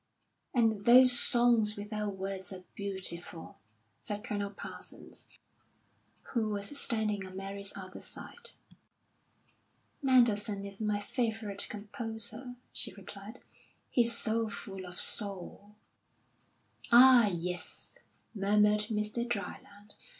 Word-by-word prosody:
"And 220 -4 +2
those 255 +1 +8
'Songs 240 -3 +5
Without 210 -1 -4
Words' 190 -1 -6
are 185 -1 -9
beautiful," 185 -4 -5 0.4
said 205 0 -5
Colonel 205 -3 -3
Parsons, 200 - -8 1.0
who 225 -3 0
was 205 +6 -1
standing 220 -7 +1
on 185 0 -10
Mary's 195 +1 -3
other 185 -1 -9
side. - - -2 1.5
"Mendelssohn 225 -6 +2
is 200 +1 -9
my 210 -1 0
favourite 220 -2 -2
composer," 225 +3 -6 0.2
she - - -3
replied. 200 +3 -10 0.5
"He's 235 -1 +4
so 225 0 0
full 195 -2 -7
of 180 - -7
soul." 200 0 +1 1.2
"Ah, 245 -1 +8
yes," 180 +1 -4 0.3
murmured 210 +1 +2
Mr. 215 +2 -1
Dryland. 205 -2 -6
210 Hz, 100 wpm, -31 LUFS, 200-230 Hz, 1.5 s, those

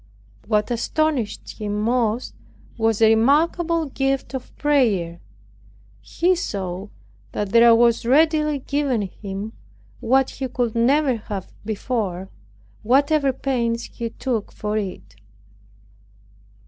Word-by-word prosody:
What 210 +1 +1
astonished 265 -1 -1
him 210 -1 -2
most 230 +1 0 0.4
was 225 -1 +1
a 220 - +7
remarkable 320 +8 +2
gift 270 -2 -2
of 260 -2 -7
prayer. 215 - +1 0.8
He 355 - +1
saw 195 - -4 0.5
that 205 -1 -2
there 230 +2 +7
was 235 0 +3
readily 300 +3 +3
given 275 -4 -1
him 200 +2 -6 0.5
what 265 +3 +2
he 270 - -4
could 245 -2 -2
never 260 +2 +2
have 205 -3 -7
before, 205 -4 -3 0.5
whatever 280 +4 +3
pains 235 -3 -1
he 230 -1 -6
took 230 -2 -3
for 210 0 -4
it. 105 - -5
235 Hz, 110 wpm, -22 LUFS, 210-275 Hz, 0.8 s, a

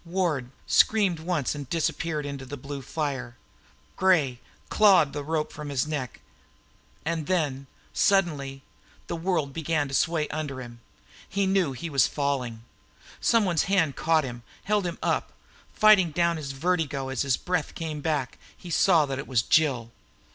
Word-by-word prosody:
Ward 165 -8 -1 0.2
screamed 200 -7 +3
once 160 -4 -1
and 145 -3 -7
disappeared 160 -2 -1
under 140 -1 -5
the 145 +2 -7
blue 140 +1 -7
fire. 135 -4 -4 0.6
Gray 155 -10 +2 0.3
clawed 195 -9 +5
the 145 0 -4
rope 155 +1 -2
from 150 -1 -7
his 140 -1 0
neck. 145 -5 -4 0.8
And 160 -2 -2
then, 145 -7 -1 0.3
suddenly, 145 -9 +1 0.4
the - - -4
world 165 -5 -1
began 160 -2 0
to - - -8
sway 160 +1 +1
under 145 -3 -4
him. 120 -2 -9 0.5
He 200 0 0
knew 190 -7 +2
he 170 +7 -6
was 135 -4 +4
falling. 130 -6 -2 0.6
Some 230 -2 +3
one's 175 -4 +1
hand 180 -7 +2
caught 160 -1 +2
him, 120 -2 -6 0.2
held 205 -2 +1
him 170 - -5
up. - - 0 0.4
Fighting 210 -5 +5
down 170 +1 +1
his 140 -3 -5
vertigo 145 -3 -1
as 130 -2 -2
his 135 -4 +1
breath 180 -4 -2
came 155 -3 -4
back, 145 -5 -2 0.2
he 175 - -9
saw 165 -2 +4
that 135 -1 -4
it 140 - -6
was 125 -4 +2
Jill. 130 -7 +2
150 Hz, 160 wpm, -26 LUFS, 135-170 Hz, 0.8 s, clawed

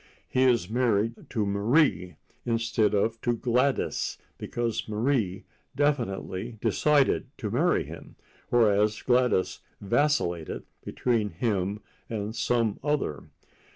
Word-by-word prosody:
He 130 +1 +2
is 120 -8 +3
married 115 -1 0
to 110 -2 -1
Marie 100 - +2 0.3
instead 115 -2 +1
of 110 +3 0
to 120 - +1
Gladys 125 +3 0 0.2
because 115 -2 -3
Marie 110 -4 0 0.3
definitely 120 -6 -1
decided 135 +7 +2
to 105 -5 -4
marry 160 +10 +2
him, - - -11 0.3
whereas 105 -2 +3
Gladys 125 -7 +2 0.2
vacillated 100 - 0 0.2
between 115 -4 0
him 100 +1 -1 0.3
and 110 0 -4
some 115 -1 0
other. 145 - -1
115 Hz, 105 wpm, -27 LUFS, 100-125 Hz, 0.3 s, is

